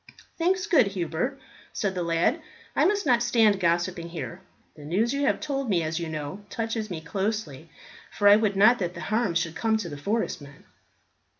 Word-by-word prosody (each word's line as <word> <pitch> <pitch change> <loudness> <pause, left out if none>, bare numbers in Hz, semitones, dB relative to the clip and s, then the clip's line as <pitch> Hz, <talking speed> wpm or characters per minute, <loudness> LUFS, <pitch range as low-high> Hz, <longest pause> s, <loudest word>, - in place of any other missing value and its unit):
"Thanks, 365 +3 +1
good 315 - +4
Hubert," 190 - -3 0.3
said 200 -3 -1
the 180 - -3
lad. 170 0 +1 0.3
"I - - +3
must 405 -1 +1
not 245 -4 +3
stand 225 -4 +3
gossiping 170 0 0
here. 170 +2 -6 0.3
The 150 - -12
news 200 - 0
you 280 0 0
have - - +1
told 275 -4 -3
me, 175 -5 +2
as 160 +1 -2
you 170 -1 -4
know, 155 +6 -6
touches 225 0 -3
me 170 -4 -5
closely, 180 -4 -3 0.4
for 205 - +2
I 205 - +9
would 210 -2 +1
not 215 +5 +5
that 180 -2 -3
harm 215 -4 -1
should 165 -1 -1
come 220 -1 +1
to 195 -6 -5
the 145 - -7
forest 205 +4 -2
men." 140 0 -14
200 Hz, 190 wpm, -26 LUFS, 170-230 Hz, 0.4 s, I